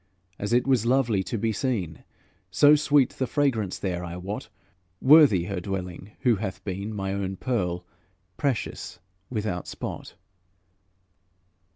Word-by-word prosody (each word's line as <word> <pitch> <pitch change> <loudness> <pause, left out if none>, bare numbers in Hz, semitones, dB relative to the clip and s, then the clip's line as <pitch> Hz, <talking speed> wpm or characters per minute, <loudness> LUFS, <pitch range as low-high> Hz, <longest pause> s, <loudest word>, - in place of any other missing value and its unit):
As 105 - -3
it 120 +1 +3
was 130 -4 +2
lovely 120 -6 +2
to 95 +5 -3
be 110 +2 0
seen, 100 - -2 0.5
So 145 +11 +6
sweet 145 -3 +4
the 130 - -2
fragrance 115 -8 0
there, 90 -2 -3
I 85 0 -6
wot, 95 +4 -6 0.5
Worthy 135 - +7
her 95 +1 -3
dwelling 95 +1 -5
who 120 -4 +3
hath 95 -2 -5
been 100 +2 -4
My 95 -2 -3
own 95 -1 -2
pearl, 90 -9 -2 0.5
precious, 130 -9 -2 0.3
without 105 -7 -3
spot. - - -6
105 Hz, 135 wpm, -26 LUFS, 95-125 Hz, 0.5 s, Worthy